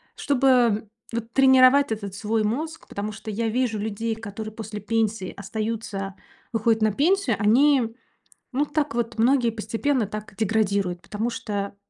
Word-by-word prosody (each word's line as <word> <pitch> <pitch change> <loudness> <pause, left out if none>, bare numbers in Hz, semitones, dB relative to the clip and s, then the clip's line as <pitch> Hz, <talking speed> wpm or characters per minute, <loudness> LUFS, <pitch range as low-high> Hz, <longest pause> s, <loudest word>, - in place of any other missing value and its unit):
чтобы 250 -6 +2 0.3
вот 230 0 -4
тренировать 265 0 +6
этот 200 -3 -4
свой 215 +2 0
мозг. 305 +10 -3
Потому 205 +1 -4
что 220 0 -8
я 225 +2 -1
вижу 240 -1 0
людей, 220 +2 -2
которые 215 0 -7
после 215 -1 -6
пенсии 220 -3 -1
остаются, 205 -1 -4 0.4
выходят 225 -1 +2
на 215 0 +3
пенсию, 380 - +2
они, 235 +2 +4 0.6
ну, 275 +3 +1
так 295 -3 -1
вот, 235 0 -2
многие 245 +1 +3
постепенно 230 +3 -1
так 215 0 -7
деградируют, 200 -4 0
потому 220 +3 -3
что, 205 -4 -4
225 Hz, 140 wpm, -24 LUFS, 210-250 Hz, 0.6 s, тренировать